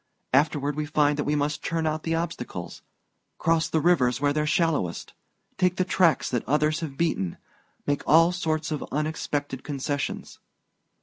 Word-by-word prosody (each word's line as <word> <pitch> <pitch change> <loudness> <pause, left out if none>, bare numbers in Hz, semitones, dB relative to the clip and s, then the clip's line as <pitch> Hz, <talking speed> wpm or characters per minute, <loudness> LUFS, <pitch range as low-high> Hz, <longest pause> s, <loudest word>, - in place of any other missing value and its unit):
Afterward 145 0 +2
we 150 0 -2
find 150 -1 +2
that - - 0
we 150 - +1
must 145 0 -1
turn 165 -1 -1
out 155 0 0
for - - -16
the 165 0 +1
obstacles 155 - -5 0.6
cross 165 -1 +1
the 160 - +1
rivers 140 -7 +3
where 145 0 +2
they're 150 0 0
shallowest 150 - 0 0.5
take 180 -1 +3
the 185 - +1
tracks 175 -5 +3
that 120 -3 0
others 150 +3 +2
have 150 -5 -6
beaten 125 - -1 0.5
make 145 0 0
all 165 +2 +6
sorts 160 -3 -2
of 150 - -2
unexpected 145 -2 -2
concessions. 140 -1 -4
150 Hz, 165 wpm, -26 LUFS, 145-165 Hz, 0.6 s, all